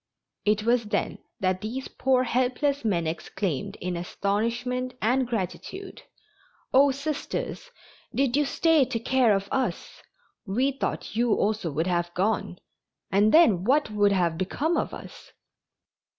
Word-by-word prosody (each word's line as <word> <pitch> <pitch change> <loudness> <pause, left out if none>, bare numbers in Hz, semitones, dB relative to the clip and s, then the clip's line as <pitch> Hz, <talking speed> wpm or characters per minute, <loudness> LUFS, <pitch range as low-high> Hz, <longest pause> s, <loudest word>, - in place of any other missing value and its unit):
It 210 0 +2
was 235 0 +2
then 210 - -2 0.2
that 185 0 0
these 245 +5 -4
poor, 255 -1 +1
helpless 260 +3 0
men 180 -7 0
exclaimed 190 +3 -3
in 180 0 -3
astonishment 235 +8 -2
and 250 +3 +1
gratitude: 245 - -5 0.7
"Oh, 280 +2 +6
Sisters, 290 - -4 0.4
did 270 -2 +1
you 295 - +3
stay 320 +1 +3
to 250 -2 -2
care 240 -2 +3
of 195 0 -2
us? 265 -1 -2 0.5
We 250 +8 +1
thought 275 - -4
you 235 -1 +2
also 205 -5 0
would 160 +3 0
have 175 -1 0
gone, 190 -1 0 0.5
and 205 +3 +4
then 225 - +5
what 270 +2 +2
would 205 -1 +3
have 175 -4 +1
become 290 - 0
of - - -1
us?" - - -11
230 Hz, 135 wpm, -26 LUFS, 195-265 Hz, 0.7 s, Oh